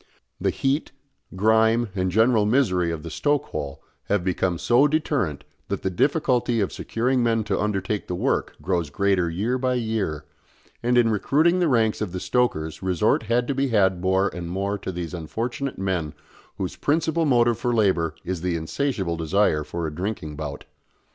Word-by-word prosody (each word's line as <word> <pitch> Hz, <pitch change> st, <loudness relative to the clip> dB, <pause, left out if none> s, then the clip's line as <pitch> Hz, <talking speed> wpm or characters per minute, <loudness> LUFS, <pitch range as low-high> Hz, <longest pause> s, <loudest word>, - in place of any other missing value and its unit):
The -, -, +1 dB
heat, 135 Hz, +3 st, -1 dB, 0.4 s
grime, 110 Hz, +3 st, +3 dB
and 95 Hz, -2 st, 0 dB
general 110 Hz, +3 st, +4 dB
misery 95 Hz, -8 st, +2 dB
of 80 Hz, -2 st, -4 dB
the 80 Hz, -, -7 dB
stoke 145 Hz, -, +1 dB
hole 70 Hz, -1 st, -5 dB, 0.2 s
have 100 Hz, -3 st, 0 dB
become 90 Hz, -1 st, 0 dB
so 125 Hz, -, +4 dB
deterrent 145 Hz, -, -1 dB, 0.2 s
that -, -, -3 dB
the 95 Hz, -, 0 dB
difficulty 125 Hz, -, +1 dB
of 100 Hz, -, -1 dB
securing 125 Hz, +3 st, 0 dB
men 115 Hz, -2 st, +2 dB
to 100 Hz, -2 st, -1 dB
undertake 105 Hz, 0 st, -2 dB
the 90 Hz, -, -2 dB
work -, -, -1 dB
grows 85 Hz, -3 st, 0 dB
greater 95 Hz, 0 st, +1 dB
year 110 Hz, +10 st, -1 dB
by 130 Hz, 0 st, +1 dB
year, 110 Hz, -, -2 dB, 0.6 s
and 125 Hz, +1 st, +2 dB
in 115 Hz, -2 st, +4 dB
recruiting 155 Hz, -, +2 dB
the 175 Hz, -, +3 dB
ranks 115 Hz, -6 st, +2 dB
of 100 Hz, -5 st, -3 dB
the 90 Hz, -, -3 dB
stokers 80 Hz, -11 st, 0 dB
resort 95 Hz, +2 st, +2 dB
had 120 Hz, +1 st, +2 dB
to 140 Hz, -, 0 dB
be 135 Hz, +1 st, 0 dB
had 95 Hz, -6 st, +2 dB
more 95 Hz, +2 st, +2 dB
and 85 Hz, -1 st, -6 dB
more 100 Hz, +3 st, -2 dB
to 95 Hz, -, -4 dB
those 90 Hz, -1 st, -5 dB
unfortunate 115 Hz, -, -4 dB
men 90 Hz, -6 st, -2 dB, 0.4 s
whose 95 Hz, -, -3 dB
principal 160 Hz, +2 st, +1 dB
motive 120 Hz, -4 st, +3 dB
for 120 Hz, -, 0 dB
labour 95 Hz, -8 st, +2 dB
is 90 Hz, -2 st, -3 dB
the 90 Hz, -1 st, -1 dB
insatiable 95 Hz, -, -2 dB
desire 80 Hz, -1 st, +2 dB
for 85 Hz, +3 st, -4 dB
a 75 Hz, -, -4 dB
drinking 90 Hz, -3 st, -4 dB
bout. 75 Hz, -1 st, -6 dB
100 Hz, 175 wpm, -24 LUFS, 90-120 Hz, 0.6 s, general